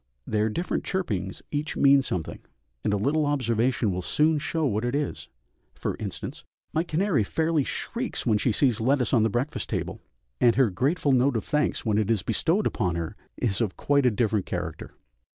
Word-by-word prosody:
Their 110 0 +1
different 170 +12 -2
chirpings 105 - -3
each 150 +1 -2
mean 140 0 +6
something, 90 -10 -3 0.4
and - - +1
a 105 - +2
little 145 +8 +1
observation 120 -4 +1
will 90 0 -2
soon 150 - +2
show 160 +2 -1
what 110 -4 0
it 120 +2 -1
is; 145 -1 -2 0.5
for - - -3
instance, - - -6 0.3
my 160 - +2
canary 170 - +1
fairly 160 +6 +1
shrieks 240 - -3
when 110 -4 +3
she 120 - +2
sees 120 0 +2
lettuce 130 +2 +2
on 120 - +5
the 110 - +3
breakfast 120 +7 -2
table, - - -3 0.4
and 120 -1 +5
her 125 -4 +3
grateful 140 - +1
note 130 -1 +3
of 110 - -4
thanks 150 -3 0
when 105 -1 +2
it 105 -1 0
is 110 -6 +1
bestowed 165 - +1
upon 90 -7 0
her 85 -1 -4 0.2
is 110 -3 0
of 105 -5 -1
quite 140 -2 +3
a - - +6
different 105 -3 0
character. - - -5
125 Hz, 190 wpm, -26 LUFS, 105-150 Hz, 0.5 s, mean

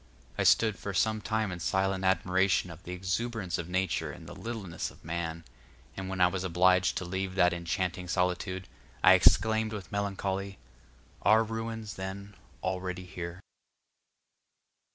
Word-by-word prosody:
I - - -1
stood 110 -3 +4
for 100 -2 -4
some 110 +3 +2
time 110 -1 -1
in 90 - -5
silent 95 +5 0
admiration 95 -1 +2
of 85 +1 -11
the 90 - -8
exuberance 95 0 -2
of 85 - -5
Nature 95 -1 0
and - - -11
the - - -9
littleness 110 -8 -5
of - - -18
man: 85 0 -3 0.5
and 95 0 -5
when 95 0 -4
I 90 - +7
was 90 +1 0
obliged 90 +1 +3
to 90 - -3
leave 95 +1 -3
that 90 -2 +4
enchanting 90 +1 -2
solitude, 90 +1 -1 0.4
I - - +9
exclaimed 110 0 +4
with 100 -3 -7
melancholy, 100 -1 -2 0.6
"Are 110 +1 +5
ruins, 115 -1 -5
then, 100 +2 -6 0.3
already 90 0 -3
here?" 90 0 -7
95 Hz, 150 wpm, -30 LUFS, 90-100 Hz, 0.6 s, I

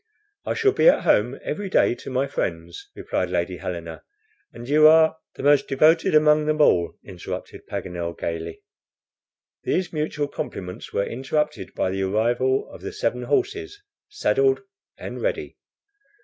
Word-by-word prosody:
"I - - 0
shall 435 -3 +3
be 480 - +5
at - - +3
home - - +2
every 200 -1 -4
day 180 - +3
to - - -9
my 130 +1 0
friends," 85 -10 -5
replied 90 - -2
Lady 90 +1 -2
Helena; 85 -2 -6 0.5
"and 120 +1 -10
you 155 +2 +6
are 160 0 +6
" - - -57
"The - - -8
most 145 -1 +4
devoted 155 +4 +3
among 150 0 +4
them 155 0 0
all," 85 - +3
interrupted 90 -3 -8
Paganel, 85 -1 -5
gaily. 85 0 -5 1.0
These 180 -1 -1
mutual 150 -1 -2
compliments 90 -6 -7
were 100 - 0
interrupted 150 +5 -3
by 95 - 0
the 95 +1 -2
arrival 120 +7 +1
of - - -11
the 405 - -5
seven 430 +4 -1
horses, 405 0 -1 0.3
saddled 405 -1 +1 0.4
and - - -7
ready. - - -3
140 Hz, 150 wpm, -23 LUFS, -, 1.0 s, you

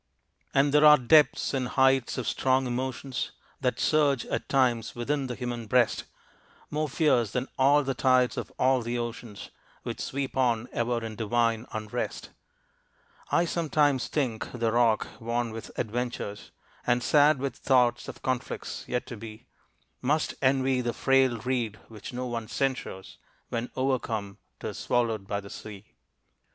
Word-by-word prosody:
And 140 +1 +3
there 150 0 +5
are 150 0 +9
depths 145 +3 +4
and 130 -2 0
heights 130 -1 +2
of 125 -3 -3
strong 130 +2 +2
emotions 130 +1 -3 0.3
That - - -1
surge 145 -5 +2
at - - -3
times 120 -4 +1
within 135 +3 -1
the 125 - -4
human 120 -2 -4
breast, 125 +2 +2 0.7
More 150 0 -1
fierce 130 -6 +2
than 125 +5 -2
all 140 +2 +4
the 135 0 -1
tides 130 0 +3
of - - -5
all 130 0 +3
the 120 +1 -2
oceans 120 -2 -6 0.3
Which - - -5
sweep 135 0 -3
on 120 -3 +1
ever 120 -1 -1
in 110 -1 -6
divine 115 +1 0
unrest. 110 +2 -4 1.0
I 175 - +3
sometimes 150 -5 +1
think 125 -7 -2
the 115 -2 -1
rock 115 -2 +3
worn 115 0 -2
with 115 0 -7
adventures, 115 -3 -3 0.4
And 120 0 +2
sad 145 +3 +5
with 135 -2 -3
thoughts 125 -3 +2
of - - -9
conflicts 130 -2 -3
yet 125 0 -2
to 120 - -7
be, 110 0 -10 0.6
Must 150 +4 +1
envy 130 -1 +2
the 120 -1 -2
frail 135 -2 +3
reed 115 -2 -2
which 105 -3 -9
no 125 0 -4
one 115 -2 -4
censures, 130 -7 -3 0.3
When 115 +1 -3
overcome 115 -6 -1 0.2
'tis - - -5
swallowed 115 -5 0
by 100 0 -1
the 100 - -11
sea. 105 -1 -9
125 Hz, 150 wpm, -28 LUFS, 115-135 Hz, 1.0 s, are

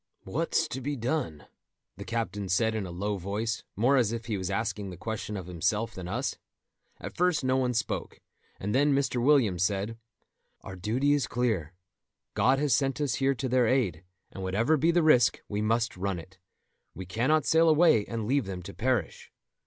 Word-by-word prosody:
"What's - - 0
to 130 - -5
be 145 +3 -2
done?" 120 - -3 0.5
the 100 - -9
captain 105 -4 -3
said 110 +5 +2
in 105 -4 -3
a - - -7
low 100 +4 -2
voice, 105 +5 -3
more 125 +7 +3
as 115 -4 +2
if 115 0 -4
he 110 - -2
was 95 -1 -3
asking 100 -1 -2
the 90 - -9
question 105 +1 -4
of 95 - -6
himself 105 +6 -1
than 90 -3 -7
us. 120 +9 -3 0.6
At - - -8
first 180 -4 +2
no 130 0 +2
one 125 -2 0
spoke, 115 - -3 0.4
and 100 +2 -3
then 140 +2 +3
Mr. 135 -3 0
Williams 120 - +3
said: 100 +4 -1 0.6
"Our 95 - -8
duty 120 +10 +1
is 140 -7 +1
clear. 105 -9 -1 0.6
God 125 +6 +3
has 145 -2 +1
sent 135 +3 +1
us 145 -3 0
here 135 0 +2
to 130 +2 -3
their 125 -1 +3
aid, 105 -11 +1 0.3
and 95 - -8
whatever 105 +11 +1
be 155 +3 +2
the 170 0 +3
risk, 125 -6 +4
we 105 0 -2
must 115 +2 0
run 95 0 -2
it; 95 +3 -12 0.6
we 95 +3 -7
cannot 125 - +1
sail 165 0 +4
away 155 -8 +5
and 115 -2 -4
leave 135 -1 +1
them 90 -2 -5
to 100 +2 -9
perish." 120 -7 -2
115 Hz, 190 wpm, -28 LUFS, 100-130 Hz, 0.6 s, away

